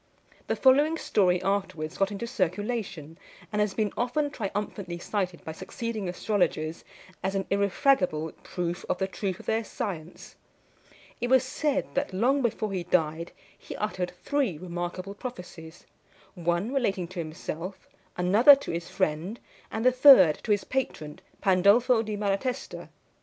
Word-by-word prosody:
The - - 0
following 290 +5 +4
story 185 - +2
afterwards 185 -5 -2
got 195 0 +3
into 205 +3 -4
circulation, 195 - -3 0.3
and 210 - 0
has 210 -2 0
been 215 -3 0
often 285 +4 0
triumphantly 200 -5 -4
cited 180 -1 -3
by 160 - -4
succeeding 215 +4 -5
astrologers 175 -4 -1 0.4
as 190 +1 -2
an 195 -1 -1
irrefragable 195 - +2
proof 175 -1 -4
of - - +1
the 190 - 0
truth 190 -1 -4
of - - -12
their 225 +1 0
science. 175 -5 -6 0.8
It 240 - -2
was 260 0 +5
said 280 +1 -1
that, 275 -7 -1
long 255 +9 +2
before 220 -3 -1
he 180 -2 -2
died, 165 -1 0 0.2
he - - -9
uttered 185 -4 -2
three 275 - 0
remarkable 175 +2 -5
prophecies 180 -8 -9 0.5
one 175 +7 -1
relating 195 -10 0
to 185 -1 -7
himself, 165 +3 -6 0.3
another 210 +11 +7
to 275 - -6
his 170 +1 -4
friend, 180 +5 -1 0.3
and 220 +2 -3
the 255 - +7
third 250 - +7
to - - 0
his 205 -1 +2
patron, 155 - -3 0.2
Pandolfo 205 +6 +4
di 215 -1 -4
Malatesta. 210 +6 -2
195 Hz, 145 wpm, -27 LUFS, 175-235 Hz, 0.8 s, another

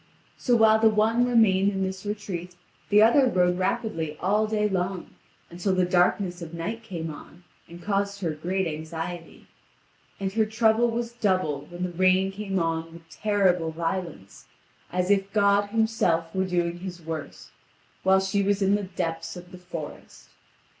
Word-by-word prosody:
So 245 - +1
while 220 -1 +5
the 225 0 +5
one 225 +3 +2
remained 200 -4 +4
in 195 -1 -2
this 190 +1 -4
retreat, 185 -4 -5 0.3
the 210 +1 +6
other 255 +4 +5
rode 180 -5 +2
rapidly 165 -5 -2
all 210 +4 +1
day 210 -1 +1
long, 185 -2 -3 0.4
until 180 +2 -1
the 185 -1 +3
darkness 180 0 +1
of 170 0 -7
night 210 +8 -4
came 165 -8 -5
on, 170 +4 -14 0.3
and 170 +1 -11
caused 200 0 -1
her 170 -4 0
great 185 +5 -2
anxiety. 165 +2 -6 0.7
And 195 -1 -3
her 220 0 +2
trouble 220 +1 +3
was 230 0 -3
doubled 185 - -1
when 175 +1 -5
the 180 - -2
rain 185 +2 +3
came 195 -1 -3
on 165 -1 -1
with 165 -1 -14
terrible 190 -6 +1
violence, 165 - -5 0.4
as 180 +2 0
if 195 0 +1
God 200 -1 +3
Himself 205 -7 +1
were 190 0 0
doing 175 -1 -1
His 180 -1 -7
worst, 160 -2 -7 0.5
while 190 0 +4
she 195 +1 0
was 200 0 +1
in 195 +1 +3
the 205 - +2
depths 165 -3 -4
of 175 0 -11
the 180 - -11
forest. 170 -4 -9
190 Hz, 165 wpm, -26 LUFS, 170-205 Hz, 0.7 s, the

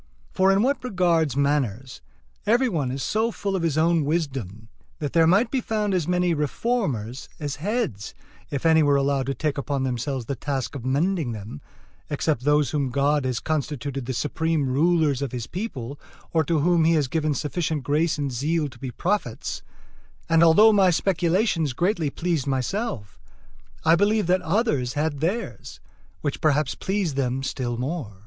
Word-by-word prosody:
For 190 +1 +3
in 195 +2 +3
what 275 +3 0
regards 170 - +1
manners, 135 -4 -1 0.5
every 240 +4 +4
one 155 - -1
is 135 +1 -3
so 220 +2 +1
full 200 -3 -3
of 185 - -1
his 165 -3 0
own 165 0 +3
wisdom, 135 - -3 0.3
that 145 -3 -4
there 165 -1 +5
might 205 +7 +3
be 265 - 0
found 210 -3 -1
as 175 -4 0
many 180 -1 +2
reformers 150 - -2
as 145 -2 -4
heads, 190 - -3 0.3
if 140 +2 -4
any 160 -1 +5
were 145 -2 +4
allowed 140 -1 +1
to 135 - -1
take 150 -2 -1
upon 140 -1 -2
themselves 130 0 -2
the 140 - -3
task 135 0 -3
of 135 -5 -6
mending 145 +1 0
them, 105 -7 -8 0.5
except 145 -3 -1
those 150 -2 +3
whom 140 -3 0
God 140 +2 +1
has 125 -3 -1
constituted 140 -4 -3
the 130 - -2
supreme 155 +2 0
rulers 150 0 +2
of 140 -3 -3
his 120 -2 -3
people 145 - -5 0.3
or 160 -1 +3
to 165 +1 +1
whom 170 +1 +3
he 165 +1 +4
has 150 -4 +2
given 155 +1 0
sufficient 150 0 -2
grace 155 +4 +1
and 145 -2 -2
zeal 150 +5 0
to 130 -2 -16
be 135 - -5
prophets; 170 - -2 0.7
and 165 0 +4
although 210 +7 +7
my 195 -3 +5
speculations 175 - +1
greatly 170 - 0
pleased 165 -2 -2
myself, 135 - -3 0.7
I 165 +1 +6
believed 205 +1 +2
that 185 0 +3
others 180 - 0
had 150 -1 -1
theirs, 190 +10 -3 0.4
which 145 -2 -3
perhaps 150 -2 +2
pleased 190 -7 -2
them 130 0 -1
still 120 -3 -3
more. 125 - -4
150 Hz, 170 wpm, -24 LUFS, 135-175 Hz, 0.7 s, although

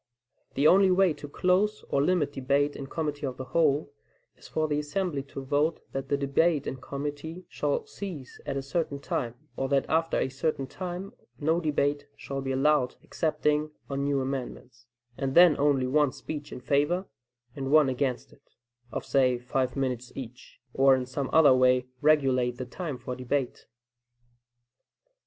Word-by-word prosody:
The 140 - +1
only 190 +4 +6
way 185 -2 +4
to 145 - -9
close 190 +7 +1
or 140 - +3
limit 150 -2 +1
debate 140 +2 +1
in 135 - -6
committee 150 -2 -3
of 130 -1 -5
the 130 - -5
whole, 145 +1 +1 0.4
is - - -15
for 155 0 -1
the 150 -1 0
assembly 150 0 -2
to 135 0 -8
vote 145 +4 +1
that 135 0 -4
the 140 - +2
debate 145 +2 +2
in 130 - -4
committee 145 +6 -6
shall 485 -3 -1
cease 185 - -8
at 135 - -2
a 135 - -3
certain 140 0 -2
time, 120 -3 -3 0.2
or 135 - -2
that 140 -1 +2
after 165 +1 +1
a - - +1
certain 135 +1 -2
time 180 +5 -6 0.3
no 160 +2 +2
debate 145 -2 0
shall 135 0 -5
be 135 0 -3
allowed 135 -1 +2
excepting 150 -1 0 0.2
on 140 0 -1
new 140 -1 +1
amendments, 125 -3 -6 0.3
and 135 -1 -2
then 175 -3 +8
only 140 -2 +3
one 145 +1 +3
speech 150 +1 -7
in 125 - -7
favor 145 +6 +2
of 190 - -7 0.5
and 135 -1 -4
one 155 -2 +6
against 130 -1 -2
it, - - -26 0.4
of - - -4
say, 130 -3 +3
five 125 +1 -1
minutes 125 -2 -2
each; 125 -2 -9
or 135 0 +5
in 130 -1 -2
some 130 +2 -3
other 155 -4 +7
way 130 0 +4 0.2
regulate 135 -5 +3
the 130 - -4
time 150 +2 -5
for 125 0 -6
debate. 130 +1 -2
140 Hz, 170 wpm, -28 LUFS, 130-155 Hz, 0.5 s, then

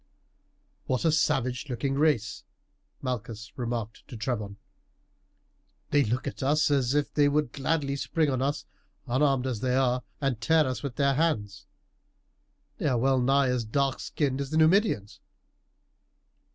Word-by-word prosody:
"What 130 +5 0
a 160 - +4
savage 135 -4 0
looking 135 +2 -2
race!" 140 -7 +1 0.6
Malchus 115 -4 -5
remarked 115 -3 -4
to 125 - -8
Trebon; 105 -4 -3 1.3
"they 145 -1 +4
look 120 +3 -2
at 140 - -5
us 145 +3 +2
as 135 -1 +2
if 145 -1 0
they 145 -1 +4
would 145 -3 0
gladly 140 -1 -1
spring 155 +2 0
on 130 -1 -1
us, 140 +2 -1 0.4
unarmed 135 0 +1
as 125 -4 -2
they 125 +2 0
are, 125 -1 +2 0.2
and 135 -6 -1
tear 160 +6 +4
us 130 -3 -3
with 135 -4 -5
their 140 0 +2
hands. 105 -11 -1 1.1
They - - 0
are 130 -4 +2
well 130 +2 +2
nigh 135 +1 +3
as 125 -2 0
dark 135 +4 0
skinned 140 -3 -2
as 140 - -4
the 155 - -1
Numidians." 160 - +2
135 Hz, 150 wpm, -27 LUFS, 120-145 Hz, 1.3 s, a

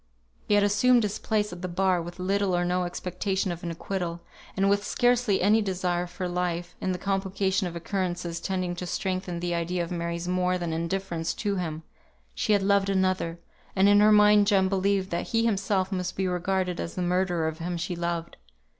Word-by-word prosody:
He 205 - +3
had 205 - +4
assumed 235 +4 +4
his 205 -1 -2
place 210 -3 -1
at 175 - -9
the 185 - -3
bar 185 0 +1
with 175 +1 -8
little 190 0 0
or 175 0 +1
no 180 0 0
expectation 185 +2 -2
of 175 0 -6
an 175 - -4
acquittal; 170 0 -4 0.4
and 195 +1 +3
with 200 0 +2
scarcely 245 -5 +2
any 215 +3 +4
desire 180 -3 -1
for 180 +1 -5
life, 175 0 -2
in 185 - 0
the 180 - -2
complication 195 0 0
of 170 - -7
occurrences 175 -1 -3
tending 185 -2 -2
to 180 - -4
strengthen 185 -2 -3
the 175 0 -1
idea 170 +1 -1
of 170 - -7
Mary's 170 0 -3
more 180 0 +1
than 170 -2 -3
indifference 170 0 -2
to 200 -2 -1
him; 160 -3 -4 0.5
she 215 - +1
had 200 -1 +3
loved 200 0 +3
another, 185 -3 0 0.4
and 195 +1 +5
in 205 0 +6
her 210 +1 +6
mind 210 -1 +6
Jem 195 -2 +3
believed 195 0 0
that 170 0 -2
he 230 0 +1
himself 195 -3 0
must 185 -1 -2
be 190 -1 0
regarded 180 0 -1
as 170 - -4
the 180 - -1
murderer 175 -2 +1
of 160 +1 -4
him 175 +1 -3
she 175 +2 -3
loved. 170 -1 -3
185 Hz, 200 wpm, -27 LUFS, 175-195 Hz, 0.5 s, in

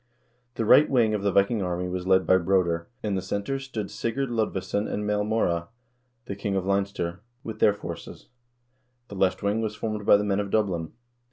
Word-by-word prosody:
The 115 - -1
right 145 +7 +6
wing 120 -5 +3
of 105 - -1
the 100 0 +1
Viking 100 +3 +2
army 90 0 -2
was 90 0 -4
led 95 0 +4
by 95 - +5
Broder; 85 -2 +1
in 105 -2 -1
the 95 - -1
center 100 +9 -3
stood 120 -7 -5
Sigurd 125 +3 -2
Lodvesson 105 -2 -1
and 105 +1 -2
Maelmorda, 105 -5 0 0.6
the 100 - -5
king 100 0 -2
of 95 -1 -1
Leinster, 100 -3 -1 0.2
with 110 -1 -7
their 105 - +4
forces; 85 -4 -9 0.8
the 100 - -8
left 95 0 +1
wing 105 +2 +1
was 110 -1 -3
formed 105 -1 -3
by - - +8
the 105 - -1
men 100 -1 0
of 100 -1 -2
Dublin. 95 -7 0
100 Hz, 190 wpm, -26 LUFS, 95-110 Hz, 0.8 s, by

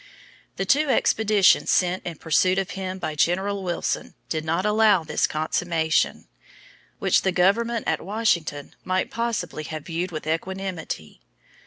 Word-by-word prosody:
The 195 - -2
two 290 +8 +3
expeditions 215 -5 +3
sent 180 0 +2
in 170 - -4
pursuit 185 +4 +2
of 195 0 -1
him 190 -1 -4
by 155 -4 -4
General 190 +6 0
Wilson 175 -2 -3
did 155 -1 -2
not 165 +4 -1
allow 210 -4 +4
this 160 - 0
consummation, 160 +1 0 0.7
which - - +2
the 190 - +1
government 225 +6 +1
at - - 0
Washington 175 -8 -1
might 185 0 -1
possibly 230 -9 -2
have 155 -1 -6
viewed 175 +2 -3
with 155 -2 -6
equanimity. 165 - -4
185 Hz, 140 wpm, -24 LUFS, 160-200 Hz, 0.7 s, allow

